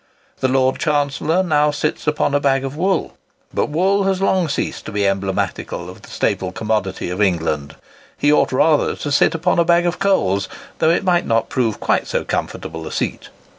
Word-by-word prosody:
The 130 - +1
Lord 130 0 +1
Chancellor 150 +3 +1
now 150 -4 +2
sits 150 +1 -2
upon 150 -1 +1
a 145 - +3
bag 135 -1 +1
of 135 +1 -5
wool; 185 +4 0 0.4
but - - 0
wool 190 +6 +2
has 190 -1 +1
long 190 -3 +1
ceased - - -3
to - - -5
be 105 -1 0
emblematical 95 -1 -2
of - - -15
the - - -14
staple 95 -1 -1
commodity 100 -4 -2
of 90 +3 -3
England. 80 -7 0 0.4
He 145 +1 +3
ought - - +3
rather 150 +3 +2
to 145 - -4
sit 145 - +3
upon 175 +2 +1
a - - +5
bag 170 +1 +3
of 175 0 -1
coals, 100 - +1 0.3
though 160 - +3
it 170 - +2
might 180 -2 +2
not 115 0 +1
prove 115 -4 -1
quite - - 0
so - - -1
comfortable 80 0 -4
a - - -7
seat. - - -3
145 Hz, 195 wpm, -19 LUFS, 105-170 Hz, 0.4 s, a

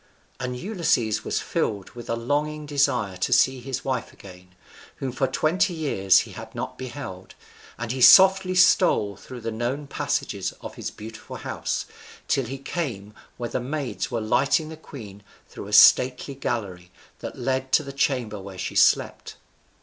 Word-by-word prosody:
And 125 -1 -4
Ulysses 160 - 0
was - - -1
filled 100 -3 -2
with 120 0 -10
a 115 - +1
longing 150 +5 -2
desire 140 -9 0
to 90 - -1
see 130 +1 +4
his 130 +1 -5
wife 130 -3 -2
again, 90 -1 -15 0.4
whom 130 - -4
for 135 +2 0
twenty 175 +7 +1
years 100 - +3
he - - -9
had - - -10
not - - -4
beheld, 120 -8 -8 0.4
and 120 0 -4
he 130 0 -3
softly 190 +4 +7
stole 180 - +4
through 125 +5 -10
the 115 +1 -3
known 120 +6 -3
passages 140 - -2
of - - -8
his - - -5
beautiful 110 +1 -10
house, - - -3 0.4
till 135 - +1
he 135 +4 -6
came 125 - -5 0.2
where 120 -1 -5
the - - -1
maids 135 +1 -3
were 120 -3 -2
lighting 135 +8 +1
the 160 - -7
queen 110 -10 -11 0.3
through - - -9
a - - -9
stately 125 +5 +6
gallery 100 -9 -4 0.3
that - - -7
led 130 0 -2
to 155 - +5
the 140 -1 -8
chamber 125 -7 -1
where 95 -1 -10
she 90 - -4
slept. - - +2
125 Hz, 165 wpm, -24 LUFS, 110-145 Hz, 0.4 s, softly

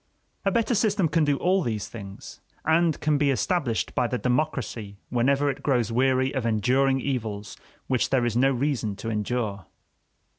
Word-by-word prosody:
A - - +4
better 230 +3 +1
system 205 -5 +2
can 155 0 +2
do 145 -1 +2
all 185 +4 +2
these 110 - -2
things, 100 -4 -10 0.2
and 160 0 +3
can 150 -1 +2
be 145 -1 +3
established 135 -2 0
by 125 - +1
the 125 - -2
democracy 125 -6 -2
whenever 135 +4 +2
it 140 - -2
grows 125 -5 +1
weary 130 +2 +2
of 130 -3 -1
enduring 125 +5 +2
evils 110 -7 -3 0.3
which 130 -2 0
there 130 -3 +2
is 120 -2 -1
no 130 +3 +4
reason 125 -5 -1
to 115 +3 -5
endure. 105 -3 -2
130 Hz, 170 wpm, -25 LUFS, 115-145 Hz, 0.3 s, A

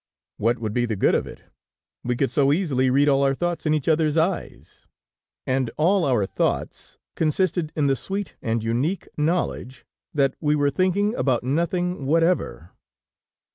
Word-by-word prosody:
What 115 +3 +1
would 110 -2 -4
be 120 0 +1
the 110 -2 -2
good 95 - +2
of - - 0
it? - - -12 0.6
We 125 0 -1
could 135 +2 0
so 140 -1 +3
easily 140 -6 +1
read 140 +3 +3
all 140 -1 +3
our 135 0 +2
thoughts 175 0 -2
in 155 - +3
each 150 - -3
others 160 -1 +2
eyes! 170 +3 -3 0.6
And 130 -2 0
all 180 +4 +3
our 120 -8 +2
thoughts - - -3 0.2
consisted 165 0 0
in 150 - +1
the 135 -1 +3
sweet 195 +7 -5
and 115 -1 -1
unique 130 +12 -1
knowledge, 150 -5 -2 0.3
that 140 -2 +1
we 150 -1 +2
were 145 -1 +1
thinking 195 +5 +1
about 130 - 0
nothing 170 +2 -1
whatever. 160 - 0
145 Hz, 165 wpm, -23 LUFS, 130-170 Hz, 0.6 s, so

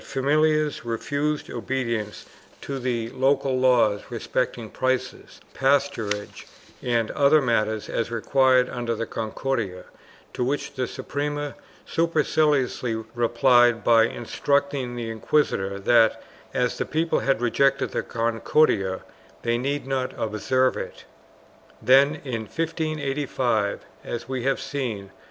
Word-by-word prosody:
IV] - - -16
CATALONIA 150 +2 +2
471 120 -3 -7
refused 145 +6 -2
obedience 115 -3 -3 0.3
to 140 -1 -5
the 120 -3 -2
local 135 0 +1
laws 120 -5 +3
respecting 120 -1 -2
prices, 130 -1 -2
pasturage 130 -7 0 0.3
and 115 -3 0
other 145 +2 +4
matters 110 -5 0
as 115 - -2
required 130 +2 +3
under 120 -2 -3
the 115 - -3
Concordia, 110 -4 -3 0.5
to - - -1
which 140 +3 -2
the 130 -2 -2
Suprema 145 +2 -4 0.3
superciliously 150 -7 +1 0.2
replied 120 -1 +4
by 115 -1 +5
instructing 140 +2 -1
the 115 -2 -4
inquisitors 100 -5 0
that, 115 -1 +4 0.3
as 125 +1 -1
the - - 0
people 160 +1 0
had 135 -4 +1
rejected 135 +3 +2
the - - -1
Concordia, 115 -3 +1 0.4
they 120 0 +1
need 140 +3 -2
not 135 -1 -2
observe 130 +5 +1
it.1 - - -5 0.9
Then, 140 +4 +5
in 115 -4 -3
1585, 140 -9 -1 0.2
as 120 - -5
we 130 -1 -3
have 135 - +1
seen 115 -9 -4
(p. - - -23
125 Hz, 120 wpm, -24 LUFS, 115-140 Hz, 0.9 s, by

